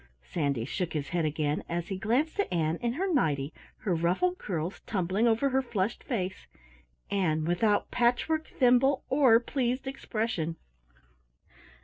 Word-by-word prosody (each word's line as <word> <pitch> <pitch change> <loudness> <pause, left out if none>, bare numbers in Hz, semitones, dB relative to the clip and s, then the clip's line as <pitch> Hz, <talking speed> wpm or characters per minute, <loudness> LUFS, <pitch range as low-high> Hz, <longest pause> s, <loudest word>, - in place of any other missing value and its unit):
Sandy 140 -8 -1
shook 170 +4 -3
his 145 -3 -3
head 170 0 0
again, 150 0 -1
as 170 0 -3
he 195 - -2
glanced 265 - 0
at 405 - 0
Ann 165 -1 +1
in 235 +3 -1
her 370 +6 -1
nighty, 150 - +1 0.3
her 205 -7 0
ruffled 180 - +1
curls 175 -1 -3
tumbling 195 +3 +1
over 235 +5 +3
her 265 0 +2
flushed 215 -5 -2
face 190 -8 -3 0.6
Ann 160 -6 +1
without 205 +5 +1
patchwork, 250 +7 +1
thimble, 260 +2 +3
or 260 -5 +6
pleased 255 +1 -1
expression! 220 - -2
205 Hz, 140 wpm, -29 LUFS, 165-255 Hz, 0.6 s, or